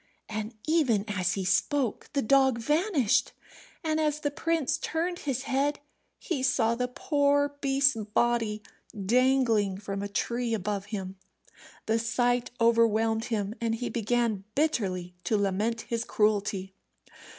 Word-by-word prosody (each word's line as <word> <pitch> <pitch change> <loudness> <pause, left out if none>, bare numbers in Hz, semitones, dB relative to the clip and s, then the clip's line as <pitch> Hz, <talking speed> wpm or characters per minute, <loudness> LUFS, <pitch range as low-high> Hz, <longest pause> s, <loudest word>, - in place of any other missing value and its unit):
And 215 +1 -5
even 270 -11 +2
as 185 -3 0
he 195 -2 -3
spoke 240 +7 0
the 280 - +1
dog 265 +1 +4
vanished, 295 - +1 0.5
and 315 -1 0
as 300 -1 0
the 290 - -1
prince 325 -1 0
turned 345 +2 -2
his 270 -7 -2
head 280 +2 0 0.4
he 290 -7 -3
saw 230 -3 +2
the 250 +1 -1
poor 285 -1 +1
beast's 275 -1 +3
body 215 0 0 0.4
dangling 235 -4 +3
from 200 0 -5
a 200 - -3
tree 235 +3 -1
above 200 -1 -3
him. 195 -2 -6 0.7
The 225 +1 +1
sight 245 +1 +1
overwhelmed 225 -1 +3
him, 210 -3 -2
and 225 -1 0
he 245 +1 -4
began 230 -3 0
bitterly 190 - 0
to 215 +4 +2
lament 205 +4 0
his 230 0 -3
cruelty. 205 -4 0
230 Hz, 135 wpm, -28 LUFS, 210-275 Hz, 0.7 s, dog